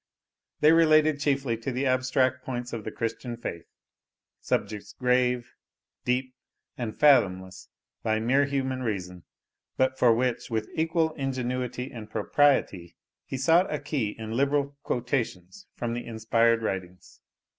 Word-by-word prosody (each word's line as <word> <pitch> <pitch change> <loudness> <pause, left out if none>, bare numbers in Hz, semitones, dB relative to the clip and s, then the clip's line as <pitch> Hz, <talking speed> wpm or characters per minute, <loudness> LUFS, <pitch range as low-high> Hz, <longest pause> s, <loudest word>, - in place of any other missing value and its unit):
They 150 +1 +7
related 155 -2 +5
chiefly 140 -5 0
to 115 +4 -4
the 130 +2 -1
abstract 130 0 +1
points 125 -2 -5
of 115 -2 -4
the - - -4
Christian 115 +1 -4
faith, 85 -7 -6 0.7
subjects 105 0 -3
grave, 125 -1 +1 0.5
deep, 130 +1 0 0.4
and 115 -4 -5
fathomless 95 -11 +3 0.3
by 110 0 0
mere 130 +5 +3
human 130 -2 -2
reason, 90 -7 -4 0.5
but 130 0 +1
for 120 - +6
which, 120 +1 0
with 110 -2 -2
equal 160 0 +1
ingenuity 125 -2 -3
and 110 -4 -9
propriety, 110 - +1 0.3
he 135 - -4
sought 165 +8 +3
a 150 - 0
key 140 -7 -2
in 110 -1 -6
liberal 140 +3 +1
quotations 120 - -3
from 120 -1 -3
the 120 0 -5
inspired 115 +1 +2
writings. 90 -3 -5
125 Hz, 135 wpm, -27 LUFS, 110-140 Hz, 0.7 s, They